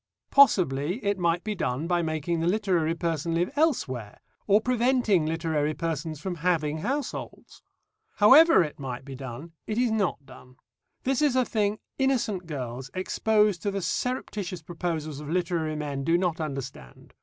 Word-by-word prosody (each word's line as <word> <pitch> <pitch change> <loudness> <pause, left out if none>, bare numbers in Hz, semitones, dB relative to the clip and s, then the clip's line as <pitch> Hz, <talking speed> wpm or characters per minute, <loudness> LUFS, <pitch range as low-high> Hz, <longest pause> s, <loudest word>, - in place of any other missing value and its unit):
Possibly 175 - +4
it 200 -1 0
might 170 0 +1
be 215 - -2
done 140 -6 -2
by 175 0 +1
making 160 +1 -2
the 165 - 0
literary 180 -5 +1
person 165 -1 -2
live 175 +2 0
elsewhere 130 - 0 0.3
or 205 0 +5
preventing 240 -7 +2
literary 155 -2 -1
persons 160 -2 -3
from 175 +2 -4
having 160 -3 0
households. 270 - -5 0.5
However 270 - +7
it 150 -2 -7
might 130 -1 -6
be 135 - -8
done, 135 +4 -8 0.2
it 215 - -2
is 245 -2 +2
not 200 -9 -1
done. 130 -1 -15 0.5
This 265 +1 0
is 290 -4 +3
a 255 -1 +3
thing 210 -2 0 0.2
innocent 235 -9 0
girls 130 -3 -5
exposed 210 0 +1
to 205 - -1
the 195 -2 -3
surreptitious 200 -9 -3
proposals 160 -3 -4
of 150 -1 -8
literary 165 -2 -1
men 145 -2 -3
do 165 +4 +3
not 175 -3 -1
understand. 135 - -7
170 Hz, 155 wpm, -27 LUFS, 150-210 Hz, 0.5 s, However